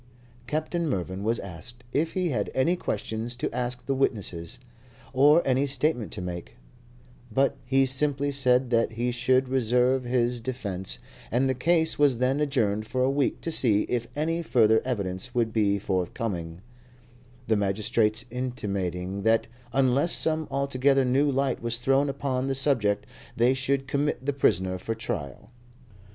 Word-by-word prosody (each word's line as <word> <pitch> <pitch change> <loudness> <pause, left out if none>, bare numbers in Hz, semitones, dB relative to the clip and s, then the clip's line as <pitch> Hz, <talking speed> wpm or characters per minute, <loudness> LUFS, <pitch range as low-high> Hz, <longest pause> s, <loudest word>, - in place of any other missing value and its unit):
Captain 155 +3 -1
Mervyn 95 -3 -3
was 115 +2 +1
asked 100 +7 -8
if 160 +3 0
he 185 -2 0
had 105 -8 -1
any 165 +7 +2
questions 110 - -3
to 120 - -3
ask 125 0 -3
the 135 - 0
witnesses, 105 -6 -1 0.6
or 145 +5 +5
any 135 +2 +2
statement 135 -3 -1
to - - -5
make; 85 -1 -6 0.8
but 135 +5 +2
he 135 +1 +4
simply 140 +1 +1
said 130 -2 +2
that 115 -1 +2
he 120 +2 -1
should 130 +2 +2
reserve 125 +1 +2
his 120 0 0
defence, 110 -7 -4 0.3
and 125 +3 +2
the 130 - +2
case 160 +5 +2
was 140 -4 +4
then 130 +3 +1
adjourned 110 -8 0
for 130 +2 0
a 130 - +2
week 140 -1 0
to 165 - -2
see 110 -9 +2
if 120 -1 -2
any 165 +3 0
further 110 -8 +3
evidence 105 -1 -3
would 115 -2 +1
be 100 -2 +2
forthcoming, 90 -2 -3 0.8
the 110 - +2
magistrates 105 +2 +1
intimating 100 -7 -3
that 110 +2 +3 0.3
unless 135 +5 +2
some 160 -1 0
altogether 135 0 +2
new 135 +4 +2
light 135 -1 0
was 115 0 -1
thrown 135 +3 +2
upon 135 -1 -2
the 135 - 0
subject 120 -7 +2 0.3
they 120 +3 +4
should 135 +1 -1
commit 140 -1 -1
the 145 - 0
prisoner 95 -8 +1
for 115 +5 -3
trial. 70 - -5
125 Hz, 155 wpm, -26 LUFS, 110-135 Hz, 0.8 s, or